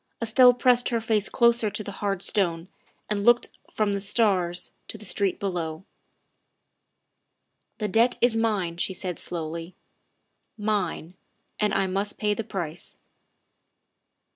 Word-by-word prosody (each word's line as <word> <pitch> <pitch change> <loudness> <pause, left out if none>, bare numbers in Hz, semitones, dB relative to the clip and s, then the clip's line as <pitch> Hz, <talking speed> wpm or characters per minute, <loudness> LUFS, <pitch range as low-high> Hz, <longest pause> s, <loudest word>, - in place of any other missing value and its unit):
Estelle 245 +2 +5
pressed 245 0 +3
her 235 -2 0
face 220 -2 0
closer 235 -2 +3
to 215 +1 -4
the 200 - -6
hard 195 -2 -1
stone 175 -3 0 0.4
and 205 -1 -1
looked 240 +2 +4 0.2
from 210 -2 0
the 200 - -1
stars 195 -4 +1 0.2
to - - -6
the 215 - -12
street 200 -3 -1
below. 175 -3 -3 0.9
" - - -47
The 210 - -2
debt 230 +5 +2
is 240 -1 +3
mine," 205 -7 0
she 185 +2 -2
said 180 -2 -4
slowly, 165 +1 -4 0.5
" - - -50
mine 205 -5 -2 0.5
and 210 -1 +2
I 195 - +1
must 195 +2 -1
pay 210 -1 +1
the 225 - -4
price." 175 -6 -6
205 Hz, 140 wpm, -25 LUFS, 180-225 Hz, 0.9 s, Estelle